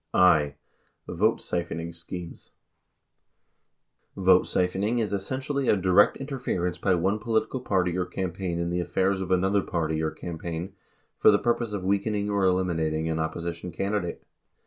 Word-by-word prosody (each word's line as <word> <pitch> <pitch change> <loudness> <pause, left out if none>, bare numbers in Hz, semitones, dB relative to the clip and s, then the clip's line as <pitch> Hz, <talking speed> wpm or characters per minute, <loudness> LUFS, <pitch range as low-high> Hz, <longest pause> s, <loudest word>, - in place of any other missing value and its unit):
57 90 - +6
i. 75 -5 +4 0.6
Vote 105 +6 +2
Siphoning 85 -1 -3
Schemes 85 0 -8 1.7
Vote - - +5
siphoning 95 +6 0
is 110 -3 -1
essentially 130 +7 -2
a 105 - +4
direct 90 -1 +4
interference 120 -11 -3
by 95 -2 +2
one 95 +5 +1
political 115 +3 0
party 90 -7 0
or 90 -1 -1
campaign 90 -1 -3
in 85 0 -1
the 90 - 0
affairs 95 +2 0
of 95 - -4
another 95 +2 +2
party 80 -3 -1
or 80 - 0
campaign 85 +2 -6 0.5
for - - +7
the 105 - +6
purpose 120 0 0
of 100 -3 -4
weakening 100 +2 0
or 100 -1 +1
eliminating 80 -4 +1
an 80 0 -1
opposition 85 +2 -4
candidate. 95 0 -2
90 Hz, 145 wpm, -26 LUFS, 85-100 Hz, 1.7 s, for